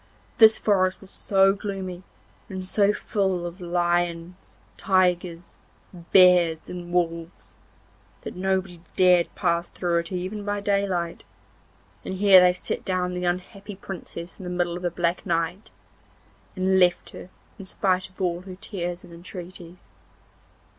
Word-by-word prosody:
This 220 Hz, -1 st, +8 dB
forest 185 Hz, -3 st, +1 dB
was 195 Hz, -, -13 dB
so 195 Hz, -1 st, +3 dB
gloomy, 195 Hz, -3 st, -5 dB, 0.5 s
and 190 Hz, -1 st, -5 dB
so 200 Hz, +2 st, +3 dB
full 190 Hz, -4 st, -1 dB
of 175 Hz, +2 st, -7 dB
lions, 175 Hz, 0 st, -2 dB, 0.2 s
tigers, 180 Hz, -2 st, 0 dB, 0.5 s
bears 180 Hz, -4 st, +5 dB
and 175 Hz, -1 st, -7 dB
wolves, 170 Hz, -1 st, -2 dB, 0.7 s
that -, -, -8 dB
nobody 190 Hz, -2 st, -2 dB
dared 180 Hz, -2 st, +5 dB
pass 170 Hz, -2 st, 0 dB
through 170 Hz, -2 st, 0 dB
it 170 Hz, +1 st, -6 dB
even 185 Hz, +3 st, -4 dB
by 205 Hz, 0 st, -2 dB
daylight, 200 Hz, -4 st, -1 dB, 0.8 s
and 190 Hz, -, -5 dB
here 195 Hz, -1 st, +7 dB
they 180 Hz, 0 st, +6 dB
set 180 Hz, -, -4 dB
down 180 Hz, -1 st, -1 dB
the 180 Hz, 0 st, -3 dB
unhappy 195 Hz, +3 st, -4 dB
Princess 180 Hz, -3 st, -8 dB
in -, -, -8 dB
the 180 Hz, -, -5 dB
middle 175 Hz, -1 st, -1 dB
of 175 Hz, -, -6 dB
the 175 Hz, -, 0 dB
black 170 Hz, 0 st, -1 dB
night, 170 Hz, +4 st, -2 dB, 0.9 s
and 190 Hz, 0 st, +2 dB
left 180 Hz, -1 st, +2 dB
her -, -, -10 dB, 0.3 s
in 195 Hz, -, -8 dB
spite 185 Hz, -1 st, 0 dB
of 185 Hz, -, -25 dB
all 175 Hz, -2 st, -1 dB
her 185 Hz, 0 st, -9 dB
tears 180 Hz, -3 st, -5 dB
and 175 Hz, -2 st, -14 dB
entreaties. 175 Hz, 0 st, -10 dB
180 Hz, 140 wpm, -25 LUFS, 175-190 Hz, 0.9 s, This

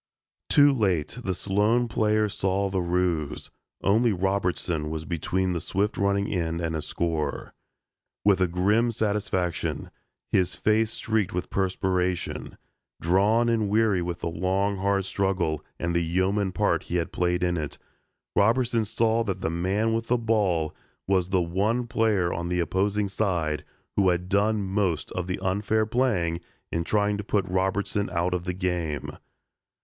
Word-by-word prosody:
Too 145 Hz, -1 st, +6 dB
late 95 Hz, -, 0 dB
the 95 Hz, -4 st, -1 dB
Sloan 105 Hz, +6 st, +1 dB
players 105 Hz, -2 st, +1 dB
saw 100 Hz, -1 st, 0 dB
the 95 Hz, -1 st, 0 dB
ruse. 85 Hz, -4 st, -1 dB, 0.3 s
Only 110 Hz, +4 st, +3 dB
Robertson 90 Hz, -4 st, -1 dB
was 80 Hz, 0 st, -4 dB
between 90 Hz, +2 st, -1 dB
the 85 Hz, -, -2 dB
swift 100 Hz, +6 st, -1 dB
running 100 Hz, 0 st, +1 dB
end 85 Hz, -2 st, -1 dB
and 80 Hz, -1 st, -2 dB
a 80 Hz, -, -2 dB
score. 80 Hz, -1 st, -2 dB, 0.7 s
With 95 Hz, -3 st, +3 dB
grim 105 Hz, +7 st, +2 dB
satisfaction, 100 Hz, -6 st, -1 dB, 0.4 s
his 90 Hz, -2 st, +2 dB
face 110 Hz, +1 st, +2 dB
streaked 110 Hz, -3 st, -1 dB
with 90 Hz, -, -3 dB
perspiration, 90 Hz, -2 st, -1 dB, 0.4 s
drawn 100 Hz, +7 st, +3 dB
and 110 Hz, -3 st, +1 dB
weary 105 Hz, -3 st, +3 dB
with 85 Hz, 0 st, -4 dB
the -, -, -2 dB
long 95 Hz, +4 st, 0 dB
hard 100 Hz, 0 st, +1 dB
struggle 95 Hz, -6 st, -1 dB
and 85 Hz, 0 st, -2 dB
the 85 Hz, -, +3 dB
yeoman 95 Hz, +4 st, +1 dB
part -, -, +1 dB
he 85 Hz, -, -4 dB
had 85 Hz, -2 st, -1 dB
played 90 Hz, 0 st, 0 dB
in 90 Hz, 0 st, +1 dB
it, 75 Hz, -3 st, -4 dB, 0.6 s
Robertson 115 Hz, +2 st, +3 dB
saw 115 Hz, +1 st, +1 dB
that 95 Hz, -3 st, -3 dB
the 80 Hz, -, -1 dB
man 95 Hz, +7 st, 0 dB
with 115 Hz, 0 st, -1 dB
the 125 Hz, -, +3 dB
ball 100 Hz, -9 st, +1 dB, 0.3 s
was 95 Hz, -2 st, +2 dB
the 95 Hz, -2 st, +2 dB
one 105 Hz, +8 st, 0 dB
player 110 Hz, -6 st, +1 dB
on 85 Hz, 0 st, -3 dB
the 90 Hz, 0 st, 0 dB
opposing 100 Hz, +4 st, 0 dB
side 90 Hz, -7 st, -1 dB, 0.3 s
who 95 Hz, -2 st, +4 dB
had 90 Hz, +1 st, -1 dB
done 105 Hz, +2 st, +2 dB
most 95 Hz, -5 st, -1 dB
of 90 Hz, -1 st, -3 dB
the 90 Hz, -, -2 dB
unfair 105 Hz, +3 st, +1 dB
playing 105 Hz, -9 st, 0 dB, 0.3 s
in 85 Hz, -, 0 dB
trying 105 Hz, +2 st, +1 dB
to -, -, -3 dB
put 100 Hz, -2 st, 0 dB
Robertson 95 Hz, +2 st, 0 dB
out 90 Hz, +1 st, 0 dB
of 90 Hz, -1 st, -2 dB
the 90 Hz, -, -2 dB
game. 90 Hz, -5 st, -2 dB
95 Hz, 155 wpm, -26 LUFS, 90-105 Hz, 0.7 s, Too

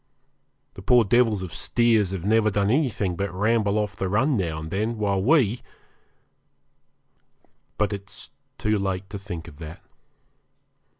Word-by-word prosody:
The -, -, -10 dB
poor 120 Hz, +4 st, +4 dB
devils 110 Hz, -2 st, +2 dB
of 90 Hz, -, -7 dB
steers 110 Hz, -1 st, +2 dB
have 95 Hz, -2 st, -5 dB
never 110 Hz, +1 st, +3 dB
done 100 Hz, 0 st, +1 dB
anything 115 Hz, -, 0 dB
but 100 Hz, +3 st, -3 dB
ramble 105 Hz, +1 st, +1 dB
off 105 Hz, -1 st, -2 dB
the 95 Hz, -, -3 dB
run 130 Hz, +9 st, +2 dB
now 85 Hz, -7 st, -2 dB
and 80 Hz, +2 st, -7 dB
again, 110 Hz, +4 st, -1 dB
while 100 Hz, -2 st, 0 dB
we 125 Hz, -2 st, +3 dB, 2.2 s
but 105 Hz, -1 st, 0 dB
it's 100 Hz, -1 st, -8 dB, 0.3 s
too 105 Hz, -1 st, 0 dB
late 95 Hz, -1 st, -2 dB
to 100 Hz, -, -5 dB
think 90 Hz, -5 st, -7 dB
of 70 Hz, -, -13 dB
that. 80 Hz, +1 st, -9 dB
100 Hz, 145 wpm, -24 LUFS, 95-110 Hz, 2.2 s, poor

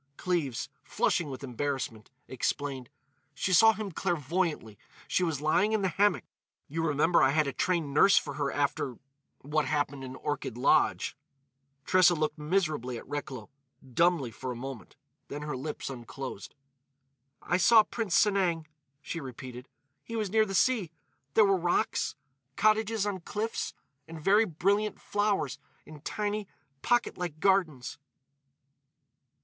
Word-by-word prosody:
Cleves, 165 Hz, -9 st, -1 dB, 0.2 s
flushing 165 Hz, -4 st, 0 dB
with 130 Hz, 0 st, -7 dB
embarrassment, 130 Hz, -4 st, -3 dB, 0.2 s
explained: 130 Hz, 0 st, -3 dB, 0.5 s
"She 185 Hz, -, 0 dB
saw 225 Hz, +5 st, +7 dB
him 215 Hz, -2 st, -5 dB
clairvoyantly. 165 Hz, -, -2 dB, 0.3 s
She 185 Hz, -, +1 dB
was 160 Hz, -5 st, -1 dB
lying 180 Hz, +8 st, +2 dB
in 215 Hz, -2 st, +1 dB
the 190 Hz, -, +2 dB
hammock. 205 Hz, +3 st, +2 dB, 0.4 s
You 165 Hz, +3 st, -3 dB
remember 160 Hz, +2 st, +3 dB
I 135 Hz, -, +5 dB
had 155 Hz, +2 st, +2 dB
a 140 Hz, -, -3 dB
trained 165 Hz, -2 st, 0 dB
nurse 195 Hz, +7 st, +6 dB
for 145 Hz, -, +1 dB
her 140 Hz, 0 st, -1 dB
after—what 140 Hz, +1 st, -3 dB
happened 145 Hz, -1 st, -1 dB
in 130 Hz, 0 st, -7 dB
Orchid 140 Hz, -4 st, -4 dB
Lodge." 125 Hz, -, +2 dB, 0.7 s
Tressa 180 Hz, -2 st, +5 dB
looked 155 Hz, 0 st, -1 dB
miserably 150 Hz, -7 st, -1 dB
at -, -, -10 dB
Recklow,—dumbly, 140 Hz, +2 st, -2 dB
for 130 Hz, +3 st, -5 dB
a -, -, -5 dB
moment. 130 Hz, 0 st, -8 dB, 0.3 s
Then 145 Hz, +1 st, -6 dB
her 150 Hz, -2 st, -3 dB
lips 145 Hz, +4 st, -5 dB
unclosed. 130 Hz, -3 st, -7 dB, 0.8 s
"I 175 Hz, -, 0 dB
saw 215 Hz, +5 st, +7 dB
Prince 215 Hz, -5 st, -2 dB
Sanang," 185 Hz, -6 st, +2 dB, 0.4 s
she 165 Hz, -, -4 dB
repeated. 130 Hz, -2 st, -9 dB, 0.3 s
"He 230 Hz, -, -7 dB
was 215 Hz, -4 st, -2 dB
near 220 Hz, 0 st, +4 dB
the 195 Hz, -, -3 dB
sea. 220 Hz, -4 st, +2 dB, 0.5 s
There 215 Hz, -, +7 dB
were 195 Hz, -1 st, +4 dB
rocks—cottages 180 Hz, -, 0 dB
on 200 Hz, -2 st, -2 dB
cliffs—and 165 Hz, -7 st, -6 dB
very 205 Hz, +7 st, +4 dB
brilliant 200 Hz, +4 st, 0 dB
flowers 200 Hz, -9 st, -1 dB, 0.3 s
in 155 Hz, -1 st, -11 dB
tiny, 210 Hz, +3 st, -2 dB, 0.3 s
pocket 240 Hz, -5 st, +1 dB
like 170 Hz, -4 st, -4 dB
gardens. 160 Hz, -10 st, +1 dB
155 Hz, 130 wpm, -29 LUFS, 135-195 Hz, 0.8 s, saw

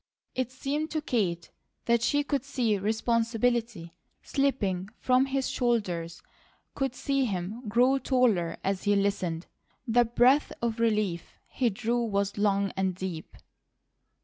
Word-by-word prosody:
It 255 Hz, -1 st, -2 dB
seemed 285 Hz, +4 st, -2 dB
to 310 Hz, -, -2 dB
Kate 185 Hz, -, -1 dB, 0.3 s
that 235 Hz, -1 st, +3 dB
she 290 Hz, +4 st, +2 dB
could 280 Hz, -3 st, -1 dB
see 245 Hz, -7 st, 0 dB
responsibility 225 Hz, -2 st, 0 dB, 0.3 s
slipping 205 Hz, -10 st, 0 dB
from 255 Hz, +1 st, +3 dB
his 270 Hz, -1 st, -1 dB
shoulders, 185 Hz, -9 st, -1 dB, 0.5 s
could 270 Hz, -3 st, -2 dB
see 275 Hz, 0 st, 0 dB
him 210 Hz, +3 st, -4 dB
grow 250 Hz, +5 st, +3 dB
taller 235 Hz, -10 st, +1 dB
as 195 Hz, +1 st, -2 dB
he 205 Hz, 0 st, +3 dB
listened. 190 Hz, -4 st, -1 dB, 0.4 s
The 240 Hz, +1 st, +4 dB
breath 250 Hz, +5 st, +3 dB
of 230 Hz, -1 st, -2 dB
relief 210 Hz, -7 st, 0 dB
he 250 Hz, -3 st, 0 dB
drew 235 Hz, +3 st, -1 dB
was 200 Hz, -2 st, -1 dB
long 200 Hz, -1 st, +2 dB
and 190 Hz, -1 st, 0 dB
deep. 180 Hz, -3 st, -6 dB
230 Hz, 130 wpm, -28 LUFS, 195-255 Hz, 0.5 s, The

